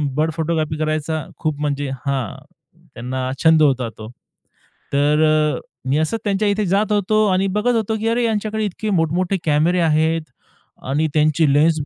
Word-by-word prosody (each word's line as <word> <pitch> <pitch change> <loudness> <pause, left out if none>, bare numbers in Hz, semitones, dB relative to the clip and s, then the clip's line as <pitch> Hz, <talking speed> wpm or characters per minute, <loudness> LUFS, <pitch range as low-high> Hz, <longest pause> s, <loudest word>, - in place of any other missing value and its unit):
Bird 155 +1 +1
photography 155 -2 -1
करायचा 155 0 -2
खूप, 155 -2 -2
म्हणजे 145 -1 -2 0.2
हां, 135 -6 -3 0.5
त्यांना 130 +2 -4
छंद 160 -1 +5
होता 130 -5 +2
तो. 110 0 -9 0.8
तर 150 +2 +3
अ, 155 -1 +2 0.3
मी 140 - +2
असंच 160 +9 0
त्यांच्या 205 0 0
इथे 205 0 +1
जात 200 +4 +1
होतो 215 +1 +2
आणि 190 +1 +1
बघत 245 +3 +1
होतो, 220 -1 0
की 225 - -2
अरे, 240 +1 +1
यांच्याकडे 220 -1 -1
इतके 210 +2 -4
मोठ-मोठे 175 +4 0
कॅमेरे 160 +4 +2
आहेत. 160 0 +2 0.7
आणि 150 +4 +1
त्यांची 155 +1 +3
लेन्स 155 +2 +3
160 Hz, 155 wpm, -20 LUFS, 150-200 Hz, 0.8 s, छंद